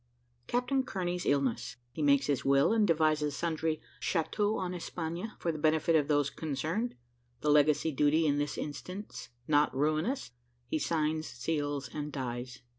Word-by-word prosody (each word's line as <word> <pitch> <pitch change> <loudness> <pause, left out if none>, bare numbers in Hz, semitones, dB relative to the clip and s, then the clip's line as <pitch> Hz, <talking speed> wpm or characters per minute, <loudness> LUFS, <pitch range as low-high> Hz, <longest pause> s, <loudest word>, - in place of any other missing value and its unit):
CAPTAIN 250 +2 +1
KEARNEY'S 180 -2 -2
ILLNESS 135 -3 0 0.2
HE 140 - -5
MAKES 140 -2 +4
HIS 140 -2 0
WILL 140 +8 +4
AND 220 -2 +3
DEVISES 155 -3 +2
SUNDRY 160 -1 -1 0.2
"CHATEAUX 205 +4 0
EN 180 - -3
ESPAGNE," 175 +4 -4
FOR 170 - -1
THE 155 - -6
BENEFIT 155 +1 +3
OF 150 -3 +3
THOSE 145 -2 +2
CONCERNED 160 - -2 0.5
THE 150 - +2
LEGACY 150 +1 +4
DUTY 150 +3 +3
IN 145 -1 +2
THIS 145 0 -2
INSTANCE 180 +8 -6 0.2
NOT 150 -2 +3
RUINOUS 155 - 0 0.4
HE 155 - 0
SIGNS, 155 0 0
SEALS, 145 +1 -2
AND 150 0 -4
DIES. 125 -2 -5
155 Hz, 150 wpm, -31 LUFS, 145-170 Hz, 0.5 s, MAKES